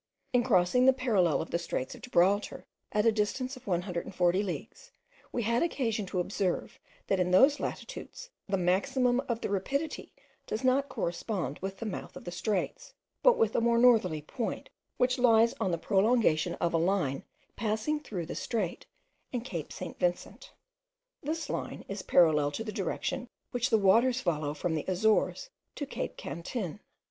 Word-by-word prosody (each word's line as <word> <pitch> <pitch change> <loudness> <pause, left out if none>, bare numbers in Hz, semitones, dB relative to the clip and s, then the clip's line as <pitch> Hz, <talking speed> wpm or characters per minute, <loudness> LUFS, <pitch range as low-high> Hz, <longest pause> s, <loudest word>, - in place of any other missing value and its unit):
In 245 - +5
crossing 240 +2 +3
the 265 - +8
parallel 210 - +2
of - - -12
the 170 - +1
straits 130 -6 -3
of - - -12
Gibraltar, 205 -3 +1 0.3
at 210 +1 +1
a 230 - +6
distance 240 +5 -1
of 255 - -15
140 180 0 0
leagues, 195 -4 -6 0.4
we 240 - -1
had 235 +2 +1
occasion 225 - -1
to 180 - -2
observe, 185 0 -2 0.3
that 195 - +1
in 180 0 +2
those 270 +11 +5
latitudes - - -6 0.2
the 195 - +2
maximum 245 +8 +2
of 235 -1 -1
the - - -2
rapidity 280 +11 -2 0.4
does 220 +4 -3
not 265 +2 +2
correspond 170 - -3
with 195 +1 -5
the 230 - -6
mouth 210 - -5
of - - -9
the 175 - -6
straits, 200 - -3 0.3
but - - +6
with 225 -1 +2
a - - +3
more 235 0 +3
northerly 220 -11 +4
point, 230 - -4 0.3
which 250 +1 +2
lies 230 -1 +5
on 190 - +1
the 170 - 0
prolongation 200 -4 +2
of 170 -1 -1
a - - +4
line 165 -6 0 0.3
passing 220 +8 -1
through 200 - -5
the 160 - -6
strait 205 -7 -3 0.4
and 245 -2 -3
Cape 170 - -5
St. - - -7
Vincent. 175 0 -2 0.7
This 320 +3 -3
line - - -4
is 195 0 -4
parallel 155 -6 +4
to 225 - -3
the 215 - -5
direction 210 +5 -3 0.2
which 245 +1 0
the 225 - +4
waters 230 +6 +4
follow 155 - -1
from 165 +2 -2
the 155 - -2
Azores 220 - +1 0.2
to 290 - -3
Cape - - -5
Cantin. 170 - -5
210 Hz, 170 wpm, -30 LUFS, 180-245 Hz, 0.7 s, the